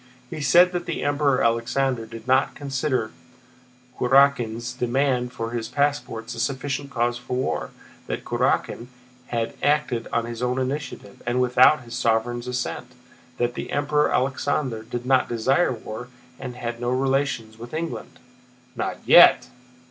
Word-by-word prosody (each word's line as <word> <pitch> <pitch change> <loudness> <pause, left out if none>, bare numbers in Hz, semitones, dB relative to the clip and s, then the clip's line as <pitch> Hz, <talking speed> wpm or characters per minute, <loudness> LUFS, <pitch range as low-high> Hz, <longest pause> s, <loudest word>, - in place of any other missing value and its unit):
He 160 -2 -5
said 175 +6 +5
that 175 -1 -4
the 165 - -3
Emperor 145 -2 +2
Alexander 115 +1 0
did 115 +2 -10
not 130 +1 +2
consider 135 -5 -2 0.9
Kurákin's 125 -3 +3
demand 125 0 0
for 115 -2 -5
his 115 -2 -3
passports 140 -5 -1
a 115 - -7
sufficient 140 +2 -2
cause 120 -2 -1
for 125 +1 -4
war; 130 - -2 0.4
that - - -4
Kurákin 120 - 0 0.4
had 115 -1 -2
acted 145 -6 +1
on 115 0 0
his 120 0 -6
own 125 +1 0
initiative 130 -6 -4
and 120 +1 +1
without 125 +3 +5
his 120 0 -11
sovereign's 120 +2 0
assent, 125 0 -4 0.4
that 120 0 0
the - - -6
Emperor 150 +1 +1
Alexander 130 -2 0
did 120 +2 -6
not 130 0 +3
desire 130 +9 +2
war, 115 0 -7 0.3
and 125 -2 -6
had 120 -1 -5
no 120 - -1
relations 130 -4 -1
with 120 +1 -9
England. 165 +1 -5 0.6
"Not 115 - -3
yet!" - - +7
125 Hz, 145 wpm, -24 LUFS, 120-140 Hz, 0.9 s, yet